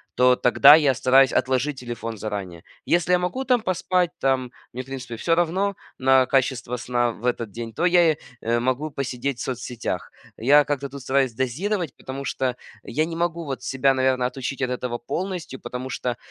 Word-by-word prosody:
то 125 0 +5
тогда 140 +4 +7
я 145 -4 +3
стараюсь 130 +1 +4
отложить 130 +2 0
телефон 115 -2 -6
заранее. 100 -5 -5 0.2
Если 175 +1 +2
я - - +6
могу 215 +10 -2
там 250 -3 +3
поспать, 185 -2 0
там, 130 -2 0 0.2
мне, 125 - -4
в - - -21
принципе, 130 -3 -7
всё 165 +8 +1
равно 185 +4 0 0.2
на 130 0 +5
качество 130 -2 0
сна 120 0 0
в 115 - -10
этот 120 -1 0
день, 115 +2 -7
то 165 - -1
я, 175 -3 +4 0.2
э, 115 +1 +1
могу 130 +5 -1
посидеть 135 -1 -3
в - - -5
соцсетях. 120 -6 -4 0.3
Я 145 +5 +5
как-то 140 -1 -2
тут 140 +1 -9
стараюсь 135 0 +1
дозировать, 155 - -2
потому 135 +1 -7
что 130 -2 -2 0.3
я 155 +6 -1
не 165 0 -6
могу 170 0 -2
вот 135 -2 -5
себя, 135 0 +2
наверно, 130 -1 +1
отучить 130 +2 -4
от 130 - 0
этого 125 -1 -3
полностью, 175 0 -5
потому 125 +1 -6
что 125 -1 -3
130 Hz, 185 wpm, -23 LUFS, 125-155 Hz, 0.3 s, тогда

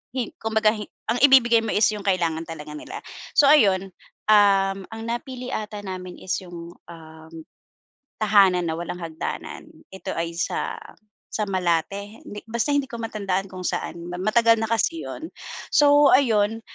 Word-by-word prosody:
Hin 250 -4 -2
kumbaga 220 -1 +2
hi 210 - -5 0.3
ang 235 +2 +1
ibibigay 240 -4 +6
mo 220 - -2
is 210 - +4
yung 205 - -7
kailangan 170 -4 0
talaga 150 -2 -8
nila. - - -8 0.4
So, 290 - +7
ayun, 195 -10 +4 0.4
um, 195 -2 +5
ang 225 0 -8
napili 245 +2 -5
ata 215 -2 -4
namin 185 -2 -7
is 185 - -2
yung, 175 -1 -10 0.2
um, 160 -1 -13 0.9
Tahanan 195 -4 +4
na 160 - -1
Walang 175 +1 -5
Hagdanan. 160 -1 -6 0.2
Ito 190 0 -6
ay 165 0 -2
sa - - -2 0.5
sa 215 - -1
Malate 190 +3 -1
hindi 205 - -8
basta 235 +5 0
hindi 285 -2 +1
ko 235 - -6
matandaan 200 -4 -2
kung 185 -1 -8
saan 170 - -3
ma 180 - -5
matagal 230 +3 +4
na - - +1
kasi 230 +9 0
yun. 320 +1 -7 0.4
So, 290 -1 +6
ayun, 225 -4 +3
205 Hz, 160 wpm, -23 LUFS, 180-230 Hz, 0.9 s, So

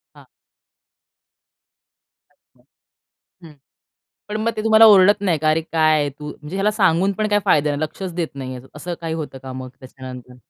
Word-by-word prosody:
हां. - - -17 2.1
अच्छा, - - -35 0.8
हं. 155 - -15 0.7
पण 210 - -3
मग 230 +1 0
ते 215 - -3
तुम्हाला 220 0 +6
ओरडत 205 0 +6
नाही 175 -5 +1
का? 155 +1 +1
"अरे 155 +1 +1
काय 155 -2 +2
तू? 150 +2 -10
म्हणजे 150 +6 -9
ह्याला 205 +2 +1
सांगून 195 -2 +2
पण 215 +2 -2
काय 205 - +2
फायदा 150 0 +2
नाही. 145 +2 -3
लक्षच 180 +4 -5
देत 170 -3 -2
नाही 130 -2 -6
आहे." 125 - -12
असं 175 +4 -6
काही 165 -1 -4
होतं 150 -4 -6
का 130 -1 -8
मग 130 0 -7
त्याच्यानंतर? 125 -1 -11
160 Hz, 170 wpm, -20 LUFS, 145-200 Hz, 2.1 s, तुम्हाला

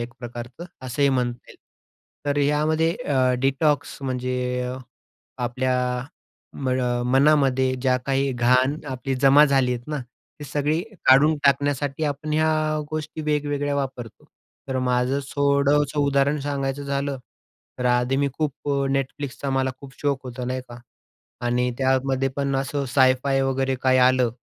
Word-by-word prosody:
एक 120 0 -5
प्रकारचं 120 +5 -8 0.2
असंही 140 +3 +1
म्हणता 125 -2 -1
येईल. - - -15 0.7
तर 145 - 0
यामध्ये 155 +3 +2
अ, 130 - +1
डिटॉक्स 135 +2 +1
म्हणजे 130 -1 -2 0.3
अ, 125 +1 -4 0.7
आपल्या 130 +1 0 0.9
मळ 130 0 +1 0.3
मनामध्ये 135 -1 +3
जी 130 - +1 0.2
काही 135 0 +1
घाण 125 +3 +3 0.2
आपली 130 +1 -3
जमा 135 +3 +6
झाली 135 -3 +2
आहेत 120 -1 -4
ना, 150 - -2 0.4
ती 150 - -8
सगळी 145 +3 0 0.3
काढून 145 +4 +6
टाकण्यासाठी 140 +1 +1
आपण 150 +1 -3
ह्या 155 +1 +2 0.4
गोष्टी 155 0 -4
वेगवेगळ्या 145 -1 -1
वापरतो. 130 -5 -5 0.4
तर 130 - -1
माझं 125 +1 +1 0.2
थोडंसं 145 +1 +2
उदाहरण 140 +1 +2
सांगायचं 140 0 -2
झालं 140 -1 -2 0.6
तर 125 - -3
आधी 125 +2 +2
मी 140 0 +1
खूप 145 -2 -3 0.3
Netflixचा 135 0 -3
मला 130 0 +1
खूप 140 -1 -11
शौक 140 -2 0
होता, 125 0 -6
नाही 130 +1 -2
का? 120 - -10 0.7
आणि 125 +1 +1
त्यामध्ये 135 0 +1
पण 140 -1 -1
असं 135 +1 -2
सायफाय 130 0 +3
वगैरे 135 0 0
काही 130 -1 +3
आलं 125 -1 +4
135 Hz, 140 wpm, -23 LUFS, 130-145 Hz, 0.9 s, जमा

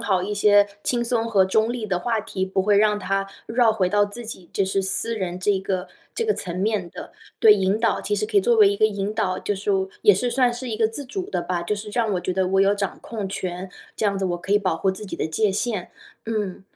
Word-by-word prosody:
好 190 -3 +1
一 205 - -3
些 205 0 +4 0.2
轻 240 -1 0
松 230 -1 0
和 200 -4 +4
中 220 +5 +1
立 240 -3 -4
的 190 -4 -1
话 225 +3 -1
题， 190 -2 -3
不 190 0 0
会 205 0 +3
让 210 0 +3
它 195 -1 -1 0.2
绕 230 -1 +3
回 190 -4 +1
到 205 +2 +3
自 215 +4 -8
己 185 -6 -9
就 195 - +1
是 195 +1 0
私 225 +4 -1
人 180 -3 -3
这 195 - +2
一 195 - +2
个 190 -1 -3 0.3
这 460 - -1
个 430 - +2
层 180 - -5
面 210 -4 0
的。 180 - -9 0.3
对， 220 - +8
引 195 0 +1
导， 230 -2 +1
其 210 - -1
实 205 +1 -1
可 210 -1 -2
以 - - +7
作 235 +5 +3
为 215 -3 +6
一 200 - -1
个 215 - +4
引 200 0 -3
导， 185 -3 -1
就 - - -1
是 205 +1 -1 0.3
也 205 - +7
是 245 +6 -1
算 245 0 +2
是 250 +1 -6
一 220 - -2
个 220 0 +3
自 225 +6 -6
主 370 +8 -5
的 - - -2
吧， 180 -1 -2
就 210 - 0
是 210 +1 -7
让 225 -2 0
我 180 - 0
觉 185 - -2
得 185 0 0
我 190 +1 +2
有 195 +1 +4
掌 200 -2 -3
控 215 -4 -5
权， 185 -1 -5 0.3
这 215 - 0
样 200 -1 0
子 195 - -2
我 175 -1 -1
可 190 +3 -3
以 205 - +5
保 185 -4 0
护 190 +3 +1
自 200 +3 -8
己 195 - -6
的 - - -1
界 200 +7 +1
限。 205 -1 -2 0.4
嗯， 210 -4 -3
205 Hz, 295 characters per minute, -23 LUFS, 190-220 Hz, 0.4 s, 对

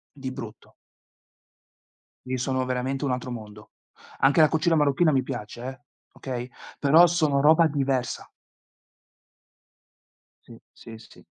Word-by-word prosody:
Di 130 -2 -6
brutto. 115 -5 -10 1.5
Lì 130 0 -3
sono 130 +1 -1
veramente 130 +2 -3
un 135 - -1
altro 125 0 -4
mondo. 105 -2 -10 0.5
Anche 140 +3 +3
la 155 - +7
cucina 165 +1 +1
marocchina 150 +2 +2
mi 130 -2 +1
piace 120 -3 -7
eh, 130 +1 -7 0.3
okay? 125 -2 -6 0.3
Però 155 +5 +6
sono 155 -5 +1
roba 160 +2 +5
diversa. 135 -4 -2 2.2
Sì, - - -14
sì, 115 -1 -12
sì. 110 - -18
135 Hz, 120 wpm, -25 LUFS, 125-150 Hz, 2.2 s, la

